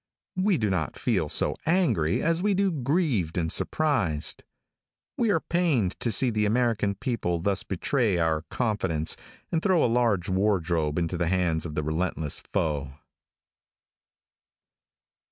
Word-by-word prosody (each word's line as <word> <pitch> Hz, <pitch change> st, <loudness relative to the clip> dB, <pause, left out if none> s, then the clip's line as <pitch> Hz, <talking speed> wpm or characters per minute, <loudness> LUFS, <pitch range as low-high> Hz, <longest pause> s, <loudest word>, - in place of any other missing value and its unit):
We 190 Hz, -1 st, +2 dB
do 105 Hz, -6 st, 0 dB
not 80 Hz, -6 st, -2 dB
feel 95 Hz, -11 st, 0 dB
so -, -, +1 dB
angry 160 Hz, -, +2 dB
as 165 Hz, +1 st, +1 dB
we 205 Hz, 0 st, +2 dB
do 195 Hz, 0 st, +2 dB
grieved 135 Hz, -, 0 dB
and 80 Hz, -2 st, 0 dB
surprised. 115 Hz, -, 0 dB, 0.7 s
We 230 Hz, -, +1 dB
are 185 Hz, -, +3 dB
pained 155 Hz, -, +1 dB
to 115 Hz, -, 0 dB
see 125 Hz, +4 st, +2 dB
the 105 Hz, -1 st, +1 dB
American 110 Hz, -3 st, +1 dB
people 100 Hz, -6 st, -2 dB
thus 95 Hz, +4 st, 0 dB
betray 105 Hz, +1 st, 0 dB
our 80 Hz, -2 st, +1 dB
confidence, 95 Hz, -10 st, 0 dB, 0.4 s
and 165 Hz, -, +1 dB
throw 185 Hz, -4 st, +3 dB
a -, -, +4 dB
large 115 Hz, -6 st, +1 dB
wardrobe 90 Hz, -6 st, 0 dB
into 85 Hz, +1 st, -1 dB
the 85 Hz, -, +1 dB
hands 85 Hz, -3 st, 0 dB
of 75 Hz, -, -8 dB
the 75 Hz, -, -1 dB
relentless 80 Hz, -1 st, -1 dB
foe. 70 Hz, -4 st, -2 dB
100 Hz, 140 wpm, -26 LUFS, 80-135 Hz, 0.7 s, a